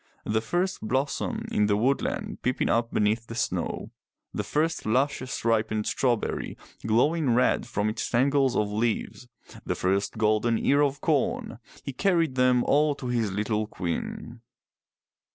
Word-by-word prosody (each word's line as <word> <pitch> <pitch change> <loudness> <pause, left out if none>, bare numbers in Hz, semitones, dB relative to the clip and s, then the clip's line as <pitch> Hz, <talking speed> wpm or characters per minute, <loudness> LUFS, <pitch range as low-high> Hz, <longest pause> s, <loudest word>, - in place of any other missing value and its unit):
The 110 +1 0
first 175 +11 -1
blossom 130 +5 -1
in 105 0 +2
the 100 -1 +2
woodland 130 +6 -1
peeping 125 0 0
up 115 0 +1
beneath 110 +2 +1
the 115 - -7
snow, - - -2 0.4
the - - -2
first 160 +2 -1
luscious 130 +2 -1
ripened 110 -2 +1
strawberry 120 -4 -1 0.3
glowing 125 +4 +2
red 125 -1 +2
from 105 -3 -1
its 110 +1 -2
tangle 135 +2 +2
of 105 -1 -1
leaves, 115 +3 -2 0.4
the - - -2
first 95 +4 0
golden 110 +1 +2
ear 140 +5 +3
of 140 0 0
corn, 150 -5 0
— - - -20
he 140 - -4
carried 165 -3 +1
them 125 -1 +3
all 150 +1 +3
to 125 -3 -6
his 115 -4 0
little 105 +2 -1
queen. 100 +6 -5
120 Hz, 150 wpm, -26 LUFS, 110-140 Hz, 0.4 s, ear